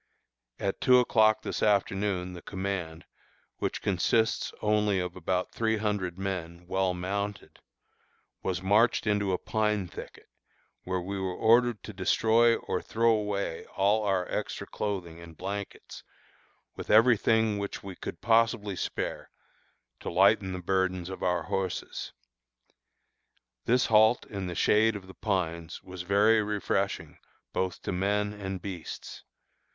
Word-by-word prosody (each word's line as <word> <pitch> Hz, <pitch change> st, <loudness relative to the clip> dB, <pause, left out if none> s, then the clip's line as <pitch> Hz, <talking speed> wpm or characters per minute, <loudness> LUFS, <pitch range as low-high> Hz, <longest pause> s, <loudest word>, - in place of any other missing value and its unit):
At 100 Hz, -1 st, -3 dB
two 125 Hz, -1 st, +6 dB
o'clock 110 Hz, -3 st, +4 dB
this -, -, -3 dB
afternoon 95 Hz, -3 st, +1 dB
the 90 Hz, -, -9 dB
command, 95 Hz, -4 st, -4 dB, 0.5 s
which -, -, -3 dB
consists 105 Hz, +4 st, +1 dB
only 105 Hz, -2 st, +2 dB
of 90 Hz, -1 st, -3 dB
about 90 Hz, +1 st, -1 dB
three 110 Hz, -1 st, 0 dB
hundred 105 Hz, -4 st, -2 dB
men, 90 Hz, -3 st, -4 dB
well 95 Hz, 0 st, 0 dB
mounted, 100 Hz, +2 st, -4 dB, 0.8 s
was 95 Hz, 0 st, -2 dB
marched 110 Hz, +6 st, +3 dB
into 105 Hz, -2 st, +1 dB
a 90 Hz, -, +1 dB
pine 105 Hz, -3 st, 0 dB
thicket, -, -, -10 dB, 0.6 s
where 95 Hz, 0 st, -1 dB
we 95 Hz, +2 st, -4 dB
were 95 Hz, -1 st, -2 dB
ordered 115 Hz, 0 st, +3 dB
to 105 Hz, -, -8 dB
destroy 115 Hz, +5 st, +3 dB
or -, -, -3 dB
throw 115 Hz, +1 st, +2 dB
away 105 Hz, -5 st, -1 dB
all 105 Hz, +3 st, +3 dB
our 95 Hz, -3 st, 0 dB
extra -, -, -3 dB
clothing 90 Hz, -5 st, -4 dB
and 85 Hz, -1 st, -12 dB
blankets, 100 Hz, +1 st, -6 dB, 0.7 s
with -, -, -8 dB
every 115 Hz, +3 st, +7 dB
thing 110 Hz, -1 st, +2 dB
which 100 Hz, 0 st, -5 dB
we 95 Hz, -2 st, -7 dB
could 85 Hz, -, -7 dB
possibly 115 Hz, -3 st, +2 dB
spare, -, -, -4 dB, 0.7 s
to -, -, -5 dB
lighten 95 Hz, +1 st, +4 dB
the 90 Hz, -1 st, -5 dB
burdens 95 Hz, -1 st, 0 dB
of 95 Hz, -, -7 dB
our 90 Hz, -1 st, +1 dB
horses. 95 Hz, -2 st, -3 dB, 1.5 s
This 125 Hz, +2 st, +3 dB
halt 110 Hz, +2 st, +4 dB
in 100 Hz, -3 st, -5 dB
the 90 Hz, -, -5 dB
shade 110 Hz, +4 st, +3 dB
of 100 Hz, -2 st, -7 dB
the 95 Hz, -, -12 dB
pines 85 Hz, -4 st, -3 dB
was 90 Hz, -1 st, -8 dB
very 105 Hz, +4 st, +4 dB
refreshing 105 Hz, -1 st, -2 dB, 0.3 s
both 95 Hz, -1 st, -2 dB
to -, -, -2 dB
men 105 Hz, +3 st, 0 dB
and 95 Hz, -2 st, -5 dB
beasts. 90 Hz, -5 st, -7 dB
100 Hz, 140 wpm, -29 LUFS, 90-105 Hz, 1.5 s, every